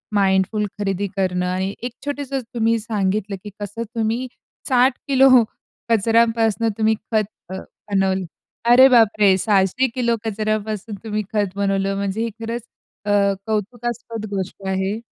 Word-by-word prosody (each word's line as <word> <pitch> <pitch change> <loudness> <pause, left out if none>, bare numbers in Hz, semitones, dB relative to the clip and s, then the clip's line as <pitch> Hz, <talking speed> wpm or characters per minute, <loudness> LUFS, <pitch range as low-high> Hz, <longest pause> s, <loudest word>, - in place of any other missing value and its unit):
Mindful 195 +2 +2
खरेदी 200 0 -1
करणं 180 -2 0
आणि 190 +2 -1
एक 245 - -3
छोटसं 285 -2 -3
तुम्ही 230 0 +2
सांगितलं, 205 -2 -1
की 210 - -7
कसं 210 +3 -4
तुम्ही 230 +3 -1 0.4
60 255 0 +4
किलो 270 -1 +6 0.6
कचऱ्यांपासून 225 0 +3
तुम्ही 220 0 +3 0.2
खत 215 -1 +3 0.3
अ, 190 - -5 0.3
बनवलं. 190 -1 +1 0.5
अरे 260 +2 +9
बापरे! 215 -5 +5
600 200 +5 +2
किलो 235 -2 +1
कचऱ्यापासून 215 0 -2
तुम्ही 215 -1 -2
खत 205 -3 0
बनवलं, 195 0 0
म्हणजे 200 +2 -2
हे 230 - -1
खरंच 230 +1 -4 0.4
अ, 205 - 0 0.4
कौतुकास्पद 230 +1 -3
गोष्ट 195 0 -4
आहे. 190 +3 -1
215 Hz, 130 wpm, -21 LUFS, 195-230 Hz, 0.6 s, अरे